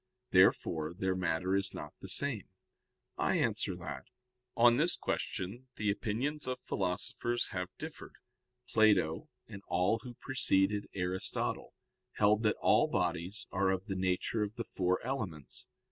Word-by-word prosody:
Therefore 80 +1 +3
their 95 +1 0
matter 90 +1 0
is 100 0 +1
not - - -7
the - - -8
same. - - +1 0.7
I - - +2
answer - - +1
that, - - -7 0.5
On 120 0 +6
this 165 +5 +2
question 105 +8 -3
the 105 -1 +1
opinions 125 +8 -2
of 130 0 -2
philosophers 100 +6 -1
have 90 -1 -3
differed. - - -8 0.5
Plato 100 -8 +3 0.2
and 100 - -9
all 90 +6 +2
who 120 +2 -9
preceded 105 -6 +2
Aristotle 90 0 -2 0.4
held 105 +1 +3
that 105 -2 +2
all - - +5
bodies 95 +8 -1
are 95 0 +2
of 95 0 0
the 95 - -3
nature 95 +4 0
of 105 +1 -2
the 115 - -3
four 90 0 0
elements. 95 - -4
100 Hz, 140 wpm, -33 LUFS, 90-115 Hz, 0.7 s, On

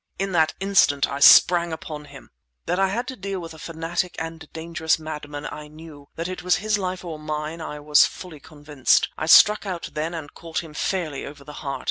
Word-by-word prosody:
In 195 0 -2
that 160 -3 +2
instant 190 -8 +3
I 140 - -5
sprang 170 +3 +7
upon 155 -2 -7
him! 140 -2 -14 0.3
That 180 - -1
I 195 - +4
had 235 +6 -3
to 260 - -6
deal 195 -2 -5
with 165 -2 -8
a 160 - -13
fanatic, 165 +3 -3
a 165 0 -3
dangerous 160 0 -2
madman, 150 -2 -7
I 150 0 -8
knew; 150 -2 -13
that 165 +1 -4
it 185 -3 -6
was 180 +1 +2
his 215 0 0
life 185 -1 -4
or 160 -3 -6
mine, 155 +2 -4
I 150 -2 -6
was 150 0 +5
fully 175 -5 -10
convinced. 145 -3 0
I 155 - -4
struck 210 +5 +7
out 180 -3 -5
then 160 +3 -3
and 155 -3 -8
caught 165 0 -5
him 160 -2 -12
fairly 155 -4 -2
over 140 0 -10
the 150 - -11
heart. 140 -3 -4
160 Hz, 210 wpm, -23 LUFS, 150-180 Hz, 0.3 s, sprang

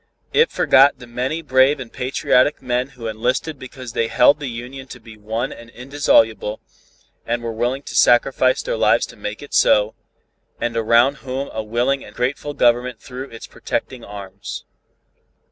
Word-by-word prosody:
It 470 +1 +4
forgot 140 +2 +4
the 125 - -12
many 130 +7 -3
brave 135 +1 +3
and 125 -3 -9
patriotic 130 +2 +1
men 125 0 -1
who 115 - -8
enlisted 125 +7 -2
because 130 -2 -9
they 115 - 0
held 140 +5 +4
the 145 - -4
Union 125 +3 -8
to 125 - -10
be 115 -1 -13
one 110 +4 -3
and 115 0 -13
indissoluble, 115 -5 +1 0.6
and 120 0 -2
were 115 - -3
willing 120 +5 -2
to - - -8
sacrifice 130 +1 +3
their - - -2
lives 115 - +3
to - - -14
make 105 +3 -6
it 145 - -12
so, 105 +1 +4 0.7
and 120 -1 -2
around 115 +4 +3
whom 135 +1 -5
a 110 - -2
willing 120 +5 0
and 105 - -14
grateful 140 +3 -2
government 120 0 +2
threw 130 +2 -8
its 115 - -10
protecting 125 -2 -5
arms. 100 -1 -8
125 Hz, 165 wpm, -20 LUFS, 115-135 Hz, 0.7 s, It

